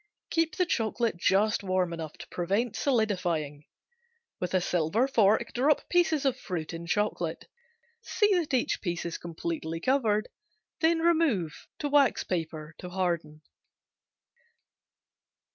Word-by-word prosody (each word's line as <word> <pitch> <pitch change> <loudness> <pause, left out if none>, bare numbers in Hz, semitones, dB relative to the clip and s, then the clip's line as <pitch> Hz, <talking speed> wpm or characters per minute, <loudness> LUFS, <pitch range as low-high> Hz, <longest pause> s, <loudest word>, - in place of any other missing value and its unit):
Keep 325 -1 +1
the 365 - +2
chocolate 230 - 0
just 200 +5 +2
warm 185 -2 0
enough 160 -2 -6
to - - -11
prevent 200 +6 -1
solidifying. 180 - 0 0.7
With 180 +1 -2
a - - +5
silver 180 +8 +1
fork 225 -2 +3
drop 280 +5 +2
pieces 330 -5 +2
of 260 -1 +1
fruit 170 -7 -4
in 170 0 -6
chocolate. 210 +5 -1 0.6
See 420 -2 +2
that 345 -5 0
each 255 -3 +1
piece 175 -3 -3
is 170 - -4
completely 165 -1 -4
coated, 220 -2 +1 0.5
then 325 0 +3
remove 315 - +1
to 295 - -2
wax 285 -2 +3
paper 160 -3 -4
to 180 - -7
harden. 170 -4 -2
200 Hz, 125 wpm, -28 LUFS, 170-270 Hz, 0.7 s, a